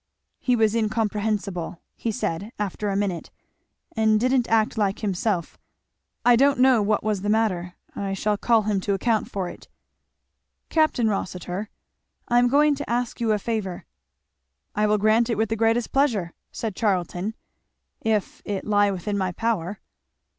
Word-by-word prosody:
"He 250 Hz, -, +2 dB
was 220 Hz, -2 st, +3 dB
incomprehensible," 210 Hz, -5 st, -1 dB, 0.2 s
he 230 Hz, -, -2 dB
said 205 Hz, -2 st, -3 dB
after 205 Hz, 0 st, -2 dB
a 195 Hz, -, -1 dB
minute, 195 Hz, -4 st, -2 dB, 0.7 s
"and 220 Hz, -1 st, +3 dB
didn't 255 Hz, +1 st, +2 dB
act 220 Hz, -1 st, +2 dB
like 200 Hz, -3 st, 0 dB
himself 195 Hz, -3 st, -1 dB, 0.7 s
I 245 Hz, 0 st, +7 dB
don't 275 Hz, +3 st, +4 dB
know 255 Hz, -3 st, +5 dB
what 205 Hz, +1 st, +1 dB
was 210 Hz, -3 st, 0 dB
the 205 Hz, -, -2 dB
matter. 185 Hz, -5 st, 0 dB, 0.2 s
I 195 Hz, -1 st, -2 dB
shall 210 Hz, +2 st, 0 dB
call 225 Hz, +1 st, +3 dB
him 205 Hz, -1 st, 0 dB
to 200 Hz, +1 st, 0 dB
account 220 Hz, +2 st, 0 dB
for 190 Hz, -3 st, -3 dB
it." -, -, -10 dB, 1.0 s
"Capt. 315 Hz, -1 st, +2 dB
Rossitur, 195 Hz, -3 st, -2 dB, 0.6 s
I 240 Hz, 0 st, +4 dB
am 245 Hz, -, +4 dB
going 290 Hz, +3 st, +4 dB
to 290 Hz, -, -6 dB
ask 240 Hz, 0 st, -1 dB
you 225 Hz, -2 st, +2 dB
a 210 Hz, -, +3 dB
favour." 205 Hz, -4 st, -3 dB, 0.9 s
"I 210 Hz, 0 st, +2 dB
will 210 Hz, 0 st, +3 dB
grant 215 Hz, +3 st, +3 dB
it 230 Hz, -, 0 dB
with 220 Hz, 0 st, +1 dB
the 225 Hz, -, 0 dB
greatest 225 Hz, +1 st, +1 dB
pleasure," 225 Hz, -12 st, +1 dB, 0.2 s
said 220 Hz, -4 st, -4 dB
Charlton, 190 Hz, 0 st, -1 dB, 0.7 s
"if 215 Hz, -3 st, -1 dB
it 200 Hz, -2 st, -4 dB
lie 205 Hz, -1 st, +3 dB
within 200 Hz, +2 st, -2 dB
my 185 Hz, -1 st, 0 dB
power." 205 Hz, -2 st, -2 dB
215 Hz, 160 wpm, -24 LUFS, 195-230 Hz, 1.0 s, I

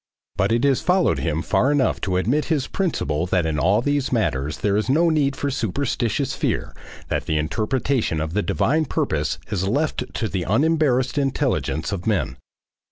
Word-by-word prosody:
But 100 Hz, +3 st, +1 dB
it 115 Hz, +1 st, +2 dB
has 140 Hz, -2 st, +3 dB
followed 180 Hz, 0 st, +2 dB
him 80 Hz, 0 st, -1 dB
far 140 Hz, -, +2 dB
enough 145 Hz, -3 st, +1 dB
to 95 Hz, -3 st, 0 dB
admit 125 Hz, +11 st, +1 dB
his 150 Hz, -6 st, 0 dB
principle 90 Hz, -, -1 dB
that 90 Hz, -2 st, +1 dB
in 80 Hz, -1 st, -1 dB
all 100 Hz, +7 st, +3 dB
these 145 Hz, -1 st, 0 dB
matters 75 Hz, -, 0 dB
there 100 Hz, -1 st, 0 dB
is 105 Hz, +4 st, 0 dB
no 165 Hz, +5 st, +4 dB
need 140 Hz, -3 st, +1 dB
for 140 Hz, 0 st, -2 dB
superstitious 125 Hz, +1 st, -1 dB
fear, -, -, -2 dB, 0.3 s
that -, -, -2 dB
the 80 Hz, -, +1 dB
interpretation 105 Hz, -, 0 dB
of 80 Hz, +1 st, -3 dB
the 105 Hz, -, +1 dB
divine 155 Hz, +8 st, +1 dB
purpose -, -, -1 dB
is 95 Hz, -2 st, -1 dB
left 145 Hz, +9 st, -1 dB
to 115 Hz, -, -1 dB
the 95 Hz, -3 st, -2 dB
unembarrassed 135 Hz, -, +2 dB
intelligence 130 Hz, -, -1 dB
of 95 Hz, -1 st, -4 dB
men. 90 Hz, -12 st, 0 dB
115 Hz, 175 wpm, -22 LUFS, 90-140 Hz, 0.3 s, no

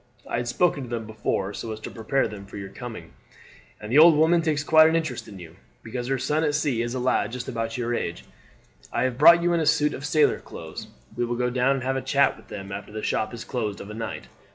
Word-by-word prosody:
I -, -, -2 dB
had 120 Hz, 0 st, -2 dB
spoken 145 Hz, +4 st, +1 dB
to 125 Hz, -, -7 dB
them 115 Hz, -2 st, -3 dB
before 105 Hz, -2 st, -2 dB
so 110 Hz, -, -5 dB
as 110 Hz, -, -6 dB
to -, -, -7 dB
prepare 115 Hz, +5 st, 0 dB
them 100 Hz, -2 st, -9 dB
for 100 Hz, -, -9 dB
your 100 Hz, -1 st, -6 dB
coming, 120 Hz, -1 st, -9 dB, 0.7 s
and 105 Hz, +1 st, -8 dB
the 140 Hz, -, +6 dB
old 165 Hz, 0 st, +8 dB
woman 165 Hz, +3 st, +4 dB
takes 155 Hz, -3 st, 0 dB
quite 155 Hz, +1 st, +6 dB
an 160 Hz, -, +1 dB
interest 160 Hz, -7 st, -2 dB
in 100 Hz, -3 st, -10 dB
you, 85 Hz, -1 st, -12 dB, 0.3 s
because 120 Hz, +2 st, -5 dB
her 135 Hz, 0 st, 0 dB
son 150 Hz, +5 st, 0 dB
at 150 Hz, -2 st, +1 dB
sea 140 Hz, -6 st, 0 dB
is 120 Hz, +1 st, -3 dB
a -, -, -2 dB
lad 125 Hz, -1 st, +1 dB
just 125 Hz, -, -5 dB
about 115 Hz, -2 st, -3 dB
your 120 Hz, -1 st, -1 dB
age. 85 Hz, -7 st, -3 dB, 0.7 s
I 120 Hz, -, 0 dB
have 130 Hz, -1 st, -1 dB
brought 170 Hz, +3 st, +8 dB
you 175 Hz, 0 st, +2 dB
in 170 Hz, -, +2 dB
a 160 Hz, -, 0 dB
suit 150 Hz, -1 st, +3 dB
of 140 Hz, -, -7 dB
sailor 150 Hz, 0 st, +3 dB
clothes; -, -, -9 dB, 0.3 s
we -, -, -1 dB
will 120 Hz, 0 st, -1 dB
go 125 Hz, 0 st, 0 dB
down 130 Hz, +2 st, +2 dB
and 130 Hz, -, -4 dB
have 135 Hz, +1 st, 0 dB
a -, -, -2 dB
chat 140 Hz, +1 st, +2 dB
with -, -, -18 dB
them 100 Hz, -1 st, -8 dB
after 100 Hz, +1 st, -7 dB
the 110 Hz, 0 st, -6 dB
shop 110 Hz, -, -1 dB
is 120 Hz, -, -8 dB
closed 110 Hz, -5 st, -3 dB
of 100 Hz, -, -8 dB
a -, -, -7 dB
night. 115 Hz, +1 st, -6 dB
125 Hz, 265 wpm, -25 LUFS, 110-150 Hz, 0.7 s, old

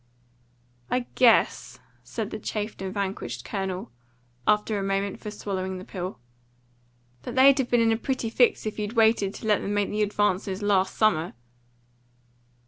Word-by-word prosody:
"I 250 Hz, -1 st, 0 dB
guess," 240 Hz, -3 st, +3 dB, 0.2 s
said -, -, -5 dB
the -, -, -5 dB
chafed 210 Hz, -1 st, -4 dB
and 190 Hz, -1 st, -3 dB
vanquished 190 Hz, -, -4 dB
Colonel, 190 Hz, -6 st, -4 dB, 0.6 s
after 210 Hz, 0 st, +2 dB
a -, -, -2 dB
moment 195 Hz, 0 st, -1 dB
for 210 Hz, -, -6 dB
swallowing 190 Hz, -2 st, -4 dB
the 185 Hz, -, -9 dB
pill, 185 Hz, 0 st, -5 dB, 1.0 s
"that -, -, -7 dB
they'd 270 Hz, +1 st, +6 dB
have 255 Hz, -, 0 dB
been 240 Hz, -1 st, +3 dB
in 225 Hz, 0 st, +3 dB
a 225 Hz, -, +2 dB
pretty 245 Hz, -2 st, -2 dB
fix 245 Hz, -1 st, +3 dB
if 215 Hz, 0 st, -4 dB
you'd 210 Hz, +1 st, -3 dB
waited 220 Hz, -4 st, +3 dB
to -, -, -8 dB
let 210 Hz, -2 st, +2 dB
them 205 Hz, -, -2 dB
make 205 Hz, -1 st, 0 dB
the 210 Hz, +1 st, -1 dB
advances 205 Hz, -1 st, 0 dB
last 195 Hz, -2 st, +2 dB
summer." 175 Hz, -6 st, +2 dB
205 Hz, 160 wpm, -26 LUFS, 190-220 Hz, 1.0 s, they'd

